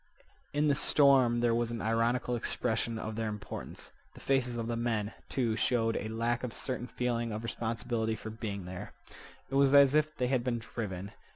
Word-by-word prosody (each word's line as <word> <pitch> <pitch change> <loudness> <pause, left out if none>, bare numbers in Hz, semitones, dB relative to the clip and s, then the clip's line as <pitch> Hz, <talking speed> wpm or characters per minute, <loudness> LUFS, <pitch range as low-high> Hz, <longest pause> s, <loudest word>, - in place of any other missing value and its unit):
In 150 +1 +2
the 145 - +4
storm 135 -5 +4
there 120 -1 +3
was 120 0 +1
an 120 -1 -4
ironical 115 +3 +1
expression 115 -1 -1
of 110 0 -4
their 110 0 -1
importance. 105 -1 -7 0.2
The - - -11
faces 125 -3 +1
of 115 - -2
the 115 0 -2
men, 115 -3 -1 0.2
too, 120 -5 0
showed 115 -1 +1
a 110 - -2
lack 115 +2 -1
of 125 - -3
a - - -10
certain 125 -2 -3
feeling 120 0 -1
of 110 +2 -4
responsibility 115 -1 -2
for 110 0 -7
being 105 -4 -5
there. 90 0 -7 0.6
It - - -7
was 140 0 +5
as 140 -1 +7
if 155 0 +2
they 125 - +1
had 125 -1 +1
been 120 -1 0
driven. 100 -4 -5
115 Hz, 195 wpm, -31 LUFS, 110-125 Hz, 0.6 s, as